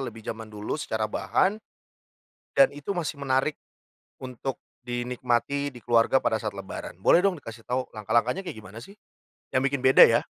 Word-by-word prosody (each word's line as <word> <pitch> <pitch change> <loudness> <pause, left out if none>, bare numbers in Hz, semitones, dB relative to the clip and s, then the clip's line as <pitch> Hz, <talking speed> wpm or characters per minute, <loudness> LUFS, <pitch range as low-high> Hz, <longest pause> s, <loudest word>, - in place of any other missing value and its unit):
lebih 115 -1 -11
zaman 110 0 -6
dulu 105 +8 -4
secara 110 -4 -2
bahan, 195 - 0 1.0
dan 275 -1 +6
itu 145 +7 -5
masih 150 -4 -3
menarik 135 +2 +1 0.7
untuk 130 +1 -4 0.2
dinikmati 125 +3 -1
di 130 -3 -8
keluarga 120 +2 +3
pada 110 - +1
saat 105 -2 -4
lebaran. 95 -2 -7
Boleh 170 - +6
dong 195 -1 +2
dikasih 115 -5 -11
tahu 125 +1 0
langkah-langkahnya 115 - 0
kayak - - -5
gimana 105 +1 -10
sih? 195 - -13 0.6
Yang 130 - +1
bikin 140 -2 -2
beda 130 0 +7
ya. - - +2
125 Hz, 160 wpm, -26 LUFS, 110-140 Hz, 1.0 s, beda